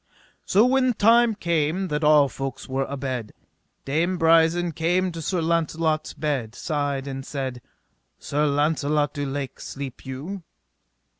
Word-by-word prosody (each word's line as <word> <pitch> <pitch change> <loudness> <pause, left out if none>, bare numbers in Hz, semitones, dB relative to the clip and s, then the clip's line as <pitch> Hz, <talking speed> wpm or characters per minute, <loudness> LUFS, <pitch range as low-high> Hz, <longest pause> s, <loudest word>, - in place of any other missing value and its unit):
So 210 +4 +4
when 255 0 +3
time 230 +2 +4
came 170 0 0
that 150 +1 -1
all 150 -1 +6
folks 135 -1 -6
were 135 0 -1
abed, 130 -5 -4 0.5
Dame 165 +6 0
Brisen 165 +1 +4
came 175 +4 0
to 165 -1 -6
Sir 175 +2 -1
Launcelot's 160 -1 0
bed's 130 -7 -2
side 145 -3 -2
and 135 -1 -5
said: 130 -3 -4 0.6
Sir 150 +1 0
Launcelot 145 0 +1
du 145 -2 -3
Lake, 135 -1 -5
sleep 135 -2 -7
you? 145 +10 -6
150 Hz, 135 wpm, -24 LUFS, 140-170 Hz, 0.6 s, all